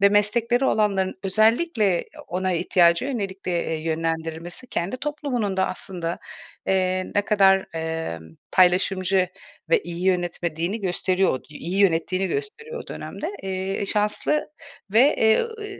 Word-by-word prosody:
ve 200 - +7
meslekleri 230 +5 +2
olanların 200 -5 +2
özellikle 215 - +2 0.2
ona 185 +1 -1
ihtiyaca 170 +2 +3
yönelik 200 -8 -4
de, 180 - -2
eee, - - -2
yönlendirilmesi, 165 +5 -3
kendi 195 0 -2
toplumunun 255 -8 -2
da 190 0 +2
aslında, 175 -2 -4 0.5
eee, 185 -1 +1
ne 205 - +3
kadar, 195 -2 +4
emm, 160 - -3 0.3
paylaşımcı 185 0 +3 0.4
ve 475 -4 +4
iyi 175 +1 -5
yönetmediğini 175 +1 -1
gösteriyor 185 0 +1
o - - -19
iyi 170 +5 -4
yönettiğini 185 0 +2
gösteriyor 455 +3 -4
o - - -20
dönemde. 320 - -6
Eee, 195 - -4 0.3
eee, 200 - -2
şanslı 210 +9 0 0.4
ve, 250 +8 +5
eee, 220 0 +4
ııı, 450 -2 -5
190 Hz, 135 wpm, -24 LUFS, 175-220 Hz, 0.5 s, ve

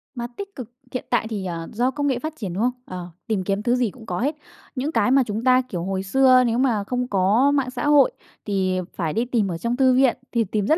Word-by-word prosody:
Mặt 240 0 -5
tích 400 0 -7
cực 245 -4 -7 0.2
hiện 255 - -4
tại 240 -2 +1
thì, 205 -4 -4
ờ, 165 -2 -4
do 245 +4 +1
công 285 +1 -2
nghệ 260 -3 0
phát 310 +3 -4
triển, 200 - -5
đúng 200 +5 -1
không? 250 - +3
Ờ, 180 -1 -7 0.2
tìm 210 -4 0
kiếm 200 +2 -1
thứ 245 0 +2
gì 245 -4 0
cũng 230 0 -14
có 180 -4 -3
hết, 290 +5 0 0.4
những 275 +4 -2
cái 250 - +2
mà 270 0 +5
chúng 220 0 -4
ta, 255 0 +5
kiểu, 185 -9 -5
hồi 190 +1 -2
xưa 255 +5 +5
nếu 230 0 0
mà 245 -6 +1
không 250 +4 -2
có 210 +7 +3
mạng 275 -3 +1
xã 255 +3 -3
hội 290 -2 +5 0.3
thì 190 -3 0 0.2
phải 165 -4 -2
đi 230 +3 0
tìm 235 -5 0
ở 170 - -3
trong 235 +7 -2
thư 260 -1 +4
viện 260 -1 +3
thì 235 -1 +2
tìm 210 0 -2
rất 315 - +4
240 Hz, 265 wpm, -23 LUFS, 200-260 Hz, 0.4 s, mà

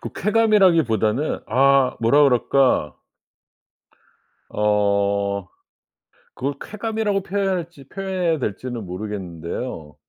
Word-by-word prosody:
꼭 - - -7
쾌감이라기보다는 165 - +2
아 135 +1 +3
뭐라 120 +6 +4
그럴까. 130 - +2 1.6
어 100 -2 0 0.9
그걸 140 +2 -3
쾌감이라고 215 -2 -2
표현해야 195 0 -1
할지 165 -6 -8
표현해야 185 -2 -2
될지는 120 -1 -4
모르겠는데요. 90 -2 -6
130 Hz, 250 characters per minute, -21 LUFS, -, 1.6 s, 뭐라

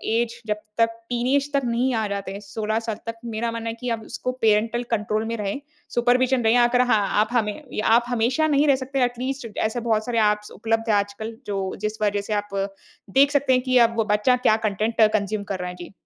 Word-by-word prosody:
Age 235 0 -1
जब 210 0 0 0.2
तक 230 0 +4 0.2
teenage 260 +4 0
तक 280 - +3
नहीं 245 +2 +1
आ 220 -2 0
जाते 200 -1 -4
हैं 200 - -6
16 215 +2 -2
साल 225 -1 -4
तक, 230 0 -4
मेरा 230 0 -2
मानना 230 0 -4
है 225 - -4
कि 250 - -3
अब 230 -1 -2
उसको 255 - -4
पैरेंटल 225 +2 +2
कंट्रोल 215 0 0
में 230 - -2
रहें 205 +4 -3 0.4
सुपरविज़न 250 +1 +3
रहे। 225 +1 +4
अगर 245 0 +4
हाँ, 210 -4 +3
आप 220 - +1
हमें 225 +1 -2
आप 235 +2 +5
हमेशा 245 +6 +1
नहीं 295 0 +3
रह 280 - +5
सकते 265 0 -1
एटलीस्ट 250 +1 -2
ऐसे 220 +2 0
बहुत 220 -2 0
सारे 235 -2 0
एप्स 210 0 -5
उपलब्ध 225 +1 -1
हैं 215 - +4
आजकल 205 +2 -2
जो 195 -2 -2
जिस 215 0 -3
वज़ह 205 -1 +1
से 215 - -1
आप 205 -1 -3 0.6
देख 280 +1 +6
सकते 280 -2 +2
हैं 255 - +3
कि 255 -1 +2
अब 230 - -9
वो 225 - +2
बच्चा 230 +5 +3
क्या 215 - +6
कंटेंट 215 +3 -1
कंज्यूम 205 0 -1
कर 195 -2 -4
रहा 180 0 -3
है। 180 - -8
जी। 175 +1 -10
230 Hz, 225 wpm, -23 LUFS, 210-245 Hz, 0.6 s, देख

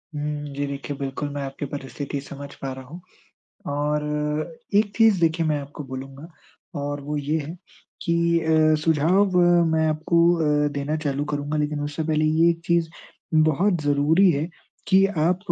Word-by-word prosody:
हुँ, 150 0 -3
जी 140 +1 -2
देखिए, 140 +1 -5
बिल्कुल 140 +1 -4
मैं 145 - -4
आपकी 135 +2 -6
परिस्थिति 140 0 -5
समझ 140 0 -9
पा 135 - -3
रहा 130 0 -9
हूँ, 160 +7 -10 0.7
और 150 +1 -1 0.7
एक 205 0 +3
चीज़ 220 -5 +5
देखिए, 165 0 +2
मैं 150 -1 +1
आपको 145 +1 -9
बोलूँगा 135 +2 -8 0.5
और 145 0 -3
वो 150 +2 -4
ये 145 +2 -1
है 155 +5 -7 0.5
कि 170 -3 0 0.3
अ, 155 -1 +3
सुझाव 180 +5 +3 0.4
मैं 160 0 +2
आपको 155 +2 0 0.5
अ, - - +2
देना 145 +2 -2
चालू 140 0 -1
करूँगा, 150 0 -3
लेकिन 150 0 -1
उससे 145 +2 -3
पहले 155 0 +1
ये 160 +2 +4
चीज़ 170 -1 +2 0.5
बहुत 160 +4 +3
ज़रूरी 150 +6 +4
है 150 +2 -1 0.4
कि 195 0 +5
आप 170 +4 +2
150 Hz, 160 wpm, -23 LUFS, 145-165 Hz, 0.7 s, चीज़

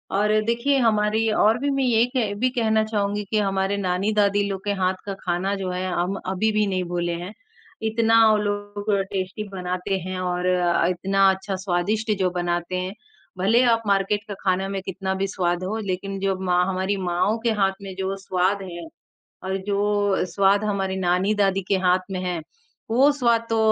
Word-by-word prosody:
और 210 +2 +2
देखिए 235 +4 +1
हमारी 220 -1 +2
और 220 +2 +3
भी 285 - -1
मैं 275 0 0
ये 235 -3 +3
एक 240 -5 -1
भी 255 +1 +2
कहना 220 -3 +2
चाहूँगी 205 -1 -1
कि 215 - +2
हमारे 195 0 0
नानी-दादी 200 +2 +1
लोग 195 0 -4
के 205 - +1
हाथ 185 0 +2
का 200 - -3
खाना 185 +3 -1
जो 190 -2 -4
है 180 +1 -3
हम 180 +3 -1
अभी 190 +4 0
भी 215 0 +2
नहीं 185 -1 -1
भूले 175 -1 -1
हैं। 185 +3 -6 0.6
इतना 225 0 +3
वो 215 - +4
लोग 205 0 -3 0.2
टेस्टी 190 +2 -3
बनाते 185 +1 -3
हैं 185 0 -4
और 180 0 -2
अ, 175 -2 +2
इतना 195 +2 +2
अच्छा 190 +1 -4
स्वादिष्ट 200 +4 -1
जो 185 -1 +2
बनाते 175 0 -2
हैं। 185 +1 -3 0.5
भले 225 +7 +4
आप 230 - 0
मार्केट 200 +1 +1
का - - -3
खाना 190 0 +1
में 195 -1 -3
कितना 190 0 -3
भी 195 +1 -1
स्वाद 175 -1 -1
हो 210 +4 -2
लेकिन 195 +2 -3
जो 195 0 0
माँ 180 -1 +2
हमारी 190 +1 -1
माँओं 180 +5 +1
के 230 - +3
हाथ 195 0 +3
में 195 -1 -7
जो 190 +1 -1
स्वाद 190 +1 0
है 170 -1 -7 0.6
और 190 +1 -1
जो 205 -1 +1
स्वाद 200 +1 +3
हमारी 195 -2 -1
नानी-दादी 195 +2 +1
के 200 - +3
हाथ 185 +2 +1
में 185 - -2
है, 180 -2 -2 0.5
वो 260 +5 +5
स्वाद 235 -5 +1
तो 225 - +1
195 Hz, 185 wpm, -23 LUFS, 185-210 Hz, 0.6 s, वो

